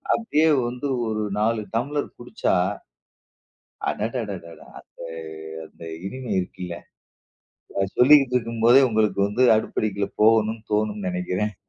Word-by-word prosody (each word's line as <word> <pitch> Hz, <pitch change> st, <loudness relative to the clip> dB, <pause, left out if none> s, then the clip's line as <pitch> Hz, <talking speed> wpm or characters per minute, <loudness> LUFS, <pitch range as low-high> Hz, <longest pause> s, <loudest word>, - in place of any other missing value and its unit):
அப்டியே 160 Hz, -9 st, +2 dB, 0.2 s
வந்து 125 Hz, +3 st, -4 dB, 0.2 s
ஒரு 110 Hz, -1 st, -1 dB, 0.2 s
4 110 Hz, 0 st, +1 dB
டம்ளர் 145 Hz, +5 st, -1 dB
குடிச்சா 120 Hz, -5 st, -1 dB, 1.3 s
அடடடடா! 105 Hz, -7 st, -5 dB
அந்த -, -, -32 dB, 0.7 s
அந்த -, -, -15 dB, 0.2 s
இனிமை 130 Hz, -1 st, -6 dB
இருக்குல்ல. 90 Hz, -1 st, -5 dB, 1.0 s
அத 95 Hz, -, +1 dB
சொல்லிட்டுருக்கும் 125 Hz, -4 st, +4 dB
போதே, 125 Hz, +3 st, +8 dB
உங்களுக்கு 110 Hz, -2 st, +1 dB
வந்து 120 Hz, +5 st, 0 dB
அடுப்படிக்குள்ள 100 Hz, -2 st, -1 dB
போகணும்னு 110 Hz, 0 st, +3 dB
தோணும்னு 105 Hz, -2 st, 0 dB
நெனைக்குறன். 90 Hz, +3 st, -2 dB
110 Hz, 105 wpm, -23 LUFS, 105-125 Hz, 1.3 s, போதே